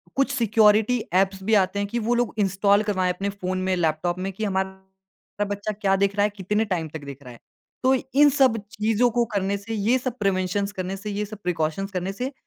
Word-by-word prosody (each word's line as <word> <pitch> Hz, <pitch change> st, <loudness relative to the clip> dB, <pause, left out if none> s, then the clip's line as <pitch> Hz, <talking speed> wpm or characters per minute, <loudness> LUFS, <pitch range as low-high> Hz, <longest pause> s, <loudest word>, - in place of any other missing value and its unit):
कुछ 275 Hz, 0 st, +1 dB
security 220 Hz, -1 st, +3 dB, 0.2 s
apps 190 Hz, 0 st, +2 dB
भी 220 Hz, +2 st, 0 dB
आते 190 Hz, +2 st, -4 dB
हैं 200 Hz, -, -1 dB
कि 235 Hz, +3 st, -2 dB
वो 240 Hz, -, +3 dB
लोग 240 Hz, -1 st, 0 dB
इंस्टॉल 200 Hz, +1 st, +3 dB
करवाएँ 185 Hz, -4 st, 0 dB
अपने 195 Hz, +3 st, -3 dB
फ़ोन 185 Hz, -2 st, -4 dB
में, 185 Hz, 0 st, +1 dB
लैपटॉप 175 Hz, +1 st, 0 dB
में 190 Hz, +1 st, -3 dB
कि 215 Hz, +4 st, -5 dB
हमारा 190 Hz, +1 st, -5 dB
बच्चा 205 Hz, +1 st, -3 dB
क्या 195 Hz, -1 st, +3 dB
देख 200 Hz, +1 st, +1 dB
रहा 205 Hz, -, +2 dB
है, 210 Hz, -, +3 dB
कितने 210 Hz, +2 st, -1 dB
टाइम 175 Hz, -5 st, -2 dB
तक 150 Hz, -1 st, -8 dB
देख 140 Hz, 0 st, -9 dB
रहा 125 Hz, -, -10 dB
है। 120 Hz, -, -15 dB, 0.4 s
तो 260 Hz, +1 st, +4 dB, 0.3 s
इन 295 Hz, -, +8 dB
सब 265 Hz, -5 st, +3 dB
चीज़ों 225 Hz, +3 st, +2 dB
को 240 Hz, +1 st, +1 dB
करने 200 Hz, +1 st, 0 dB
से 215 Hz, +3 st, -7 dB
ये 220 Hz, +4 st, +2 dB
सब 250 Hz, -1 st, -4 dB
प्रिवेंशन्स 195 Hz, 0 st, 0 dB
करने 190 Hz, 0 st, -4 dB
से, 210 Hz, +2 st, -6 dB
ये 205 Hz, +1 st, -2 dB
सब 210 Hz, 0 st, -9 dB
प्रिकॉशन्स 175 Hz, +3 st, -2 dB
करने 185 Hz, 0 st, -2 dB
से 255 Hz, +6 st, -4 dB
200 Hz, 220 wpm, -24 LUFS, 190-215 Hz, 0.4 s, इन